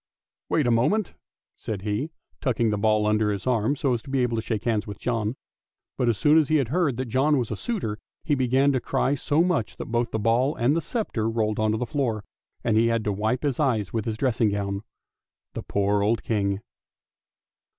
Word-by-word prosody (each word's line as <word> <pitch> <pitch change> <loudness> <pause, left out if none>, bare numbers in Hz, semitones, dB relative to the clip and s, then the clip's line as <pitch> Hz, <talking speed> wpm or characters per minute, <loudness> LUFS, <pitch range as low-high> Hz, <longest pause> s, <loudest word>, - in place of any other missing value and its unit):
" - - -67
Wait 150 - +2
a 120 - +3
moment," 165 - +2 0.4
said 100 -3 -5
he, 105 +9 -1 0.3
tucking 120 -4 +1
the 105 - 0
ball 110 0 +2
under 105 0 +2
his 100 -2 -4
arm 125 +1 +1
so 140 -3 0
as 120 - -1
to 140 - -13
be 135 -1 +1
able 120 -1 0
to 110 - -1
shake 110 -2 -3
hands 110 -3 0
with 100 -2 -6
John. 115 -1 -1 0.6
But 120 - +1
as 115 - +1
soon 150 +6 +5
as 155 - +2
he 155 - +3
heard 140 0 +1
that 130 - -2
John 135 +5 +2
was 120 -4 -2
a - - -1
suitor 175 - -3 0.2
he 150 - 0
began 130 +1 +3
to 130 - +1
cry 135 - 0
so 145 +3 +2
much 175 - -1
that - - -6
both 120 0 +1
the - - -2
ball 115 +6 +2
and 125 +5 +2
the 165 - +1
sceptre 145 - -2
rolled 110 -2 0
on 110 0 +2
to - - 0
the 125 - -2
floor, 115 -5 -1 0.4
and 115 -2 +1
he 115 +1 +4
had 115 -1 +1
to 105 - 0
wipe 110 +7 -1
his 140 -4 -1
eyes 115 -9 +1
with 110 -3 -1
his 110 -1 -2
dressing 120 -3 +2
gown. 100 -1 -2 0.7
The - - -4
poor 100 0 0
old 110 +3 +1
King! 100 -2 0
115 Hz, 225 wpm, -25 LUFS, 110-135 Hz, 0.7 s, soon